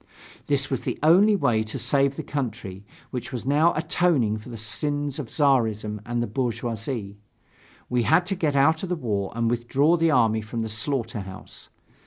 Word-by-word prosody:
This 140 Hz, -1 st, +1 dB
was 135 Hz, -, -2 dB
the -, -, -3 dB
only 195 Hz, +7 st, +6 dB
way 120 Hz, -, +2 dB
to 110 Hz, 0 st, -4 dB
save 140 Hz, -1 st, +2 dB
the -, -, -5 dB
country, 110 Hz, -8 st, -5 dB, 0.3 s
which 125 Hz, -2 st, -5 dB
was 125 Hz, -2 st, -5 dB
now 150 Hz, +5 st, +4 dB
atoning 155 Hz, -9 st, +1 dB
for 110 Hz, -, -12 dB
the 115 Hz, -, -7 dB
sins 145 Hz, +6 st, -2 dB
of 140 Hz, -, -5 dB
Czarism 110 Hz, -7 st, +1 dB
and 120 Hz, 0 st, -1 dB
the -, -, -3 dB
bourgeoisie. 115 Hz, -3 st, -3 dB, 0.7 s
We 125 Hz, -1 st, +1 dB
had 160 Hz, +9 st, +3 dB
to 195 Hz, +2 st, -1 dB
get 155 Hz, -6 st, 0 dB
out 160 Hz, +4 st, +3 dB
of 190 Hz, -, -5 dB
the 180 Hz, -, 0 dB
war 105 Hz, -, -2 dB
and 115 Hz, 0 st, 0 dB
withdraw 130 Hz, +8 st, +2 dB
the 165 Hz, 0 st, +2 dB
army 115 Hz, -6 st, +3 dB
from 110 Hz, +2 st, -4 dB
the 110 Hz, -, -4 dB
slaughter 115 Hz, +1 st, -2 dB
house. 95 Hz, -1 st, -10 dB
125 Hz, 185 wpm, -25 LUFS, 110-145 Hz, 0.7 s, only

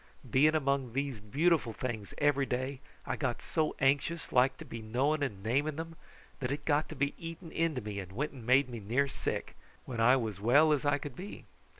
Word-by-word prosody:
Being 145 Hz, +7 st, +4 dB
among 140 Hz, -4 st, 0 dB
these 135 Hz, -3 st, -2 dB
beautiful 140 Hz, +3 st, +1 dB
things 110 Hz, -3 st, -4 dB
every 140 Hz, -2 st, +2 dB
day, 130 Hz, +2 st, -2 dB, 0.3 s
I -, -, -1 dB
got 130 Hz, -5 st, -1 dB
so 155 Hz, -2 st, -1 dB
anxious 145 Hz, +5 st, +1 dB
like 130 Hz, +1 st, +4 dB
to -, -, -9 dB
be 115 Hz, -, -7 dB
knowing 135 Hz, +8 st, +1 dB
and 105 Hz, -9 st, -3 dB
naming 140 Hz, +7 st, +1 dB
them, 165 Hz, +1 st, -6 dB, 0.4 s
that 125 Hz, -3 st, -2 dB
it 145 Hz, +1 st, -3 dB
got 150 Hz, 0 st, +2 dB
to 140 Hz, -2 st, 0 dB
eating 165 Hz, 0 st, -7 dB
into 165 Hz, -5 st, 0 dB
me 105 Hz, -1 st, -5 dB
and 95 Hz, -1 st, -7 dB
went 140 Hz, +10 st, -2 dB
and 130 Hz, -4 st, -11 dB
made 130 Hz, +4 st, +4 dB
me 120 Hz, -2 st, -6 dB
near 120 Hz, +7 st, +1 dB
sick, -, -, -4 dB, 0.3 s
when 120 Hz, -3 st, -5 dB
I 120 Hz, +3 st, +6 dB
was 110 Hz, -6 st, -2 dB
well 145 Hz, +8 st, +5 dB
as 145 Hz, -1 st, -1 dB
I 145 Hz, 0 st, +3 dB
could 145 Hz, -3 st, -7 dB
be. 195 Hz, +3 st, -8 dB
135 Hz, 205 wpm, -32 LUFS, 120-150 Hz, 0.4 s, I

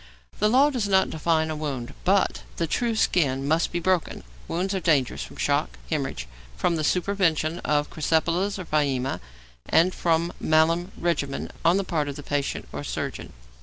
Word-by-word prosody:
The 210 Hz, -, +3 dB
law 270 Hz, +5 st, +5 dB
does 240 Hz, -7 st, -1 dB
not 190 Hz, -1 st, +3 dB
define 160 Hz, 0 st, +1 dB
'a -, -, -3 dB
wound,' 140 Hz, -6 st, -4 dB
but 195 Hz, +2 st, +2 dB, 0.2 s
the 170 Hz, -, +1 dB
true 230 Hz, +8 st, 0 dB
skin 140 Hz, -10 st, +1 dB
must 160 Hz, +3 st, +2 dB
be 175 Hz, -, -1 dB
broken. 185 Hz, -1 st, 0 dB, 0.2 s
Wounds 185 Hz, +4 st, -1 dB
are 190 Hz, -, 0 dB
dangerous 150 Hz, -7 st, +1 dB
from -, -, -8 dB
shock, 60 Hz, 0 st, 0 dB
hæmorrhage, -, -, -2 dB, 0.3 s
from 170 Hz, -, +1 dB
the 160 Hz, -, -1 dB
supervention 170 Hz, -2 st, +1 dB
of 145 Hz, 0 st, 0 dB
crysipelas 165 Hz, +5 st, +1 dB
or 185 Hz, -, -6 dB
pyæmia, 140 Hz, -4 st, 0 dB, 0.5 s
and 180 Hz, +3 st, +4 dB
from 170 Hz, 0 st, +1 dB
malum 165 Hz, +4 st, +2 dB
regimen 155 Hz, -5 st, -2 dB
on 170 Hz, +3 st, +4 dB
the 200 Hz, -, 0 dB
part 155 Hz, -5 st, -1 dB
of 140 Hz, -, -5 dB
the 145 Hz, -, -8 dB
patient 145 Hz, -1 st, -2 dB
or -, -, -4 dB
surgeon. -, -, -4 dB
165 Hz, 170 wpm, -25 LUFS, 150-185 Hz, 0.5 s, law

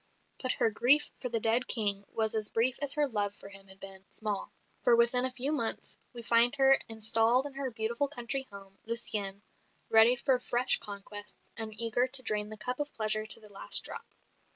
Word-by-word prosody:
But 255 Hz, -1 st, +1 dB
her 225 Hz, -, 0 dB
grief 265 Hz, +7 st, +3 dB
for 250 Hz, -, -5 dB
the 230 Hz, -1 st, -2 dB
dead 230 Hz, +4 st, +1 dB
King 205 Hz, -4 st, 0 dB
was 220 Hz, -1 st, -1 dB
as 215 Hz, -1 st, -1 dB
brief 245 Hz, +3 st, +1 dB
as 285 Hz, -1 st, +3 dB
her 295 Hz, -1 st, +1 dB
love 205 Hz, -4 st, -3 dB
for 200 Hz, -, -13 dB
him 195 Hz, 0 st, -16 dB
had 190 Hz, 0 st, -16 dB
been 195 Hz, -1 st, -9 dB
small; 210 Hz, -2 st, -5 dB, 0.3 s
for 240 Hz, -, +5 dB
within 240 Hz, +2 st, +4 dB
a 260 Hz, -, +1 dB
few 260 Hz, +3 st, -2 dB
months, 235 Hz, -7 st, -2 dB, 0.2 s
we 240 Hz, -1 st, -8 dB
find 235 Hz, +3 st, +3 dB
her 270 Hz, -1 st, +5 dB
installed 225 Hz, +3 st, +2 dB
in 285 Hz, -, -7 dB
her 270 Hz, -1 st, -4 dB
beautiful 235 Hz, +4 st, -2 dB
country 265 Hz, -1 st, -4 dB
home, 195 Hz, -1 st, -14 dB
Lucienne, 210 Hz, -3 st, -2 dB, 0.5 s
ready 225 Hz, +2 st, +6 dB
for 255 Hz, 0 st, +1 dB
fresh 245 Hz, +1 st, +2 dB
conquests, 205 Hz, 0 st, -8 dB
and 220 Hz, -1 st, -5 dB
eager 235 Hz, +2 st, +1 dB
to 260 Hz, 0 st, -1 dB
drain 210 Hz, -2 st, -2 dB
the 215 Hz, -, -9 dB
cup 250 Hz, +5 st, -4 dB
of 295 Hz, 0 st, -4 dB
pleasure 215 Hz, 0 st, -2 dB
to 220 Hz, -, -1 dB
the 215 Hz, -1 st, -17 dB
last 195 Hz, -, +5 dB
drop. -, -, -11 dB
230 Hz, 200 wpm, -30 LUFS, 210-255 Hz, 0.5 s, ready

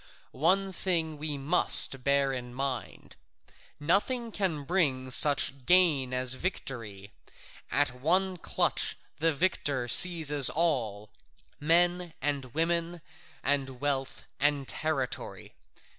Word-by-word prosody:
One 190 Hz, +7 st, 0 dB
thing 165 Hz, -5 st, -2 dB
we 150 Hz, -1 st, -4 dB
must 135 Hz, -3 st, +5 dB
bear 140 Hz, 0 st, +1 dB
in 125 Hz, -1 st, -8 dB
mind: 135 Hz, -2 st, -6 dB, 0.6 s
nothing 215 Hz, -, -1 dB
can 180 Hz, -8 st, -3 dB
bring 135 Hz, -6 st, -1 dB
such 140 Hz, -1 st, +3 dB
gain 165 Hz, -8 st, +3 dB
as 130 Hz, 0 st, 0 dB
victory; 115 Hz, -, -6 dB, 0.6 s
at 145 Hz, -2 st, +2 dB
one 185 Hz, +5 st, 0 dB
clutch -, -, -1 dB, 0.2 s
the 165 Hz, +2 st, +1 dB
victor 140 Hz, -5 st, -2 dB
seizes 150 Hz, -1 st, +5 dB
all, 115 Hz, -11 st, -2 dB, 0.5 s
men 175 Hz, +2 st, +1 dB
and 140 Hz, -1 st, -3 dB
women, 170 Hz, +1 st, -2 dB, 0.4 s
and 135 Hz, -2 st, -1 dB
wealth, 140 Hz, -1 st, -3 dB, 0.2 s
and 145 Hz, -1 st, 0 dB
territory. 155 Hz, -5 st, -4 dB
145 Hz, 105 wpm, -28 LUFS, 130-170 Hz, 0.6 s, must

